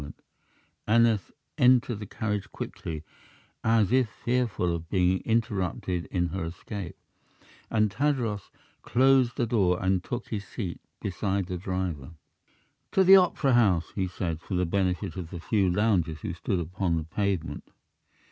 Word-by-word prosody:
Aneth 110 -2 +3 0.3
entered 125 -3 +4
the 105 - -7
carriage 105 -1 -3
quickly, 80 -2 -6 0.6
as 110 -2 +3
if 130 -3 +3
fearful 115 -8 -1
of 85 -1 -5
being 90 -1 +2
interrupted 95 -6 -1
in 90 -2 -1
her 95 +1 -3
escape, 90 +2 -6 0.7
and 105 -2 +2
Tadros 120 -5 -1 0.3
closed 130 -1 +3
the 120 - +2
door 100 -6 +2
and 95 -1 +1
took 120 +2 -5
his 105 -3 -3
seat 90 -2 -6 0.2
beside 100 0 -1
the 90 0 -4
driver. 90 -6 -3 0.8
"To 190 - +5
the 190 +1 +9
opera 155 -7 +3
house," 100 -8 +3
he 95 -2 -1
said, 85 -3 -3
for 95 - -4
the 90 0 +2
benefit 90 -1 -1
of 85 -3 -5
the 90 -1 -7
few 95 +2 +1
loungers 90 -5 +1
who - - -3
stood 90 +2 -2
upon 85 0 -1
the 80 - -2
pavement. 85 -3 -2
95 Hz, 145 wpm, -27 LUFS, 90-115 Hz, 0.8 s, the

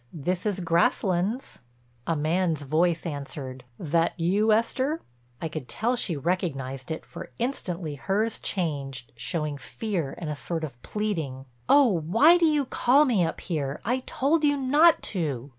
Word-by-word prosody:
This 180 +5 -2
is 195 -2 -1
Grasslands." 180 +6 +1 0.5
A 165 - +1
man's 160 0 0
voice 165 +4 +1
answered: 140 -4 -6
"That 165 +2 0
you, 200 +6 +2
Esther?" 260 +8 +1 0.4
I 165 - -2
could 155 -5 -6
tell 240 +3 0
she 175 -9 0
recognized 135 -5 -2
it, 160 - -4
for - - -9
instantly 180 - -3
hers 205 +10 -1
changed, 140 - -3
showed 145 +4 -3
fear 180 -10 -3
and 160 -3 -4
a - - -3
sort 165 +3 -4
of 130 -6 -7
pleading: 160 -12 -3 0.2
"Oh, 250 -11 +5
why 280 - +6
do 335 - +5
you 300 -3 +2
call 265 +4 +4
me 225 -10 +2
up 165 - -2
here? 145 -5 -3
I 250 +4 +1
told 300 +4 +1
you 290 -1 +3
not 295 +5 +5
to." 145 - -2
175 Hz, 155 wpm, -26 LUFS, 150-225 Hz, 0.5 s, why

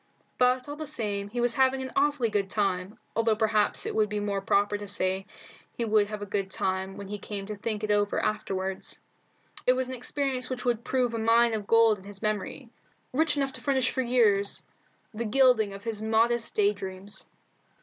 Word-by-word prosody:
But, 250 +1 +3
all 290 - -5
the 310 0 -5
same, 205 -8 -2
he 240 - -4
was 240 0 +2
having 265 0 +3
an 260 - -6
awfully 285 -4 +2
good 200 -2 0
time, 195 -1 -1 0.2
although 225 -1 +3
perhaps 215 -1 +1
it - - -2
would 215 -1 +2
be 210 -1 -2
more 200 -1 -1
proper 205 +1 +2
to 205 0 -5
say 190 -1 -1 0.5
he 235 - 0
would 215 -2 +3
have 210 0 -5
a - - -3
good 200 -1 -2
time 190 0 -2
when 200 - -7
he 205 +1 -5
came 200 -1 -5
to 210 +1 -5
think 210 +1 -3
it 210 - 0
over 205 0 +2
afterward. 195 -3 -2 0.8
It 250 - +7
was 255 0 -1
an - - -4
experience 255 0 -2
which 255 0 -4
would 235 -2 +1
prove 250 -3 0
a 230 - -2
mine 230 +1 +4
of 210 -2 -3
gold 230 -2 +5
in - - -15
his 200 -1 -9
memory, 215 +4 -3 0.4
rich 310 +2 +2
enough 275 -1 0
to - - -10
furnish 265 -3 +1
for 260 - 0
years 220 -5 +2 0.5
the 225 +2 -3
gilding 240 -2 +4
to 195 - -7
his 215 +1 -4
modest 225 +2 +1
day 205 0 +3
dreams. 195 0 -6
215 Hz, 205 wpm, -28 LUFS, 205-250 Hz, 0.8 s, It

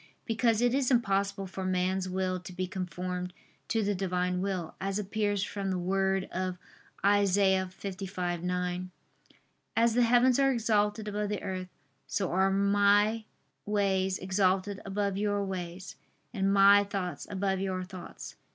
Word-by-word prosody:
Because 225 0 +2
it 245 0 +3
is 270 -2 +2
impossible 200 -5 +1
for 190 0 -6
man's 185 0 0
will 185 0 -1
to 180 +1 -10
be 185 +1 -3
conformed 180 0 -4 0.3
to 225 -1 +1
the 205 0 +1
Divine 180 -1 -1
will; 185 -4 -3
as 195 +1 -1
appears 205 -1 -1
from 200 -2 -3
the 185 - 0
word 190 +1 +1
of 185 0 -2 0.5
Isa. 195 -2 +3
55:9: 180 -2 -3 0.9
"As 230 0 +4
the 245 - +3
heavens 245 +2 +4
are 270 0 +4
exalted 215 -3 +1
above 210 0 -2
the 210 - -3
earth, 185 -2 -4 0.4
so 195 -3 -1
are 190 +2 +3
My 205 +2 +3 0.4
ways 190 -2 +1
exalted 190 +1 0
above 200 0 -1
your 205 -1 0
ways, 185 -1 -6 0.4
and 195 -3 +1
My 200 +1 +7
thoughts 185 -6 -4
above 190 -1 -1
your 190 -1 -2
thoughts." 185 -1 -9
195 Hz, 140 wpm, -30 LUFS, 185-205 Hz, 0.9 s, My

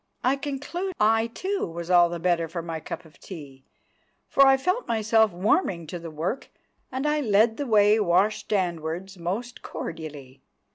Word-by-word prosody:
I 255 +2 +3
conclude 295 +7 -4
I, 225 +2 +3
too, 380 +12 -3
was 170 +1 -6
all 175 -1 +6
the 170 - -4
better 170 -1 +1
for 170 +1 -5
my 165 -1 -4
cup 175 - -7
of 160 - -19
tea, 140 -7 -11 0.6
for 275 0 +5
I 270 0 +6
felt 365 - -1
myself 220 -1 +3
warming 180 - +1
to 175 +3 -6
the 165 0 -7
work—and 235 - -6
I 300 0 +1
led 220 -1 +3
the 285 - -3
way 210 -1 +5
washstandwards 190 -2 0
most 210 +9 -4
cordially. 145 -5 -7
200 Hz, 155 wpm, -26 LUFS, 170-245 Hz, 0.6 s, all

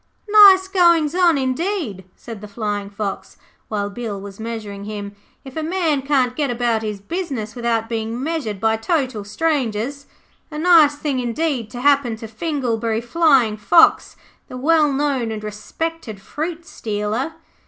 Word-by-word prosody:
'Nice 400 -3 +8
goings 340 -5 +3
on, 350 -4 +4
indeed,' 265 - -2
said 225 -4 -10
the 210 - -8
Flying 205 -1 -3
fox, 200 -1 -5 0.3
while 205 -2 -2
Bill 205 -1 -5
was 200 +1 -10
measuring 215 -3 -6
him, 205 -1 -6 0.3
'if 265 - -10
a 320 - -2
man 320 -3 0
can't 260 -3 +1
go 300 - 0
about 240 -2 0
his 210 -2 -4
business 255 - -4
without 235 -2 -1
being 225 0 -3
measured 270 -9 -3
by 220 +2 +2
total 255 - -1
strangers. 270 +2 -2 0.4
A 300 - -7
nice 315 -3 +5
thing, 290 -3 -2
indeed, 250 -1 -2
to 245 +1 -7
happen 280 -4 +3
to 225 0 -9
Finglebury 230 -3 -2
Flying 255 -5 +3
fox, 325 +10 +4 0.3
the 255 - -8
well 300 +2 +3
known 275 -4 0
and 215 -1 -5
respected 220 +3 -5
fruit 320 - -5
stealer.' 220 +8 -3
245 Hz, 150 wpm, -20 LUFS, 215-310 Hz, 0.4 s, Nice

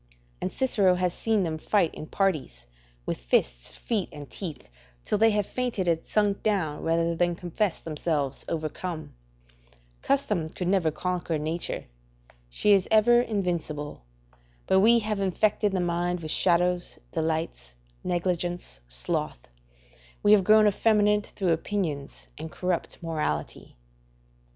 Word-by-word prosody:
And 185 - -2
Cicero 200 -8 +2
has 180 -1 0
seen 220 -3 +1
them 160 -2 -2
fight 185 -2 +1
in 155 - -8
parties, 155 - -1 0.4
with - - -3
fists, - - 0
feet, 215 -6 -2
and 145 -1 -9
teeth, 160 -7 -6 0.4
till 210 - 0
they 225 +1 +6
have 210 -2 +1
fainted 245 -7 -2
and 165 -1 +3
sunk 205 -2 +1
down, 180 -9 0
rather 165 +1 +1
than 175 0 +1
confess 180 +2 -1
themselves 150 -3 -2
overcome: 160 +1 -4 0.9
["Custom 210 - 0
could 180 +2 -4
never 185 -4 +3
conquer 175 0 -2
nature; 160 +3 -3 0.6
she 205 - +2
is 195 -2 +4
ever 240 +2 +5
invincible; 170 - -3 0.6
but 190 - +4
we 230 +4 +6
have 215 -2 -1
infected 205 +2 +1
the 190 - 0
mind 175 0 -1
with 155 -1 -3
shadows, 180 0 +1
delights, 160 - -2 0.3
negligence, 175 - -2
sloth; - - -3 0.7
we 205 - +5
have 210 -2 +7
grown 215 +2 +6
effeminate 210 0 +3
through 185 -4 +1
opinions 160 -5 -3
and 160 0 -6
corrupt 180 -2 -2
morality." 150 - -3
175 Hz, 130 wpm, -27 LUFS, 160-205 Hz, 0.9 s, have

